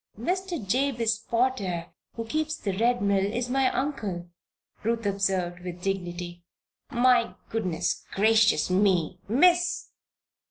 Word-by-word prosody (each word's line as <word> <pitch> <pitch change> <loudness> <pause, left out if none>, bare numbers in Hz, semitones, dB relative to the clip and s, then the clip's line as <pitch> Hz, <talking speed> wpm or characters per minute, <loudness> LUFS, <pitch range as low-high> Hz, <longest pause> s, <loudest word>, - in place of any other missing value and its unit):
"Mr. 355 - -2
Jabez 235 -2 +1
Potter, 225 -8 -1 0.2
who 230 - -4
keeps 310 +5 -1
the 195 -3 -3
Red 235 +2 +2
Mill, 200 -1 +2
is 245 +1 -2
my 265 0 +3
uncle," 210 -12 -3 0.5
Ruth 230 0 -1
observed, 190 -3 0
with 180 0 -8
dignity. 175 -2 -4 0.5
"My 245 -2 +3 0.2
goodness 180 -6 -1
gracious 215 -1 +3
me, 185 -4 +2
Miss! 350 - +3
220 Hz, 115 wpm, -27 LUFS, 185-255 Hz, 0.5 s, my